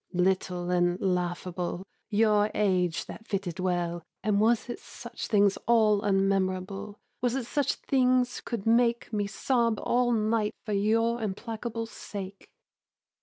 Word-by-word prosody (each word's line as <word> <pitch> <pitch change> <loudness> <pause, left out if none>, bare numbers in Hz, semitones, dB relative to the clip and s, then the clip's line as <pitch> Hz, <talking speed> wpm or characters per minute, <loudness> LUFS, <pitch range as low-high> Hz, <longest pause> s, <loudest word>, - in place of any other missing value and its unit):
Little 180 -1 0
and 175 0 +2
laughable, 180 0 -2 0.2
Your 210 -1 +3
age 180 -5 +1
that 220 - -10
fitted 190 -2 -3
well. 175 -2 -1 0.2
And 205 0 +2
was 230 +1 +3
it 240 - -5
such - - -8
things 200 -2 +3
all 215 -3 +4
unmemorable, 195 +1 0 0.2
Was 245 0 +1
it 265 -3 -2
such 285 +3 0
things 255 -2 +1
could 230 -5 -4
make 235 0 +2
Me 205 -1 0
sob 230 0 +1
all 245 0 +2
night 215 -1 +1
for 215 - -2
your 225 +3 +2
implacable 225 +2 -4
sake? 200 -3 -8
205 Hz, 130 wpm, -28 LUFS, 185-230 Hz, 0.2 s, all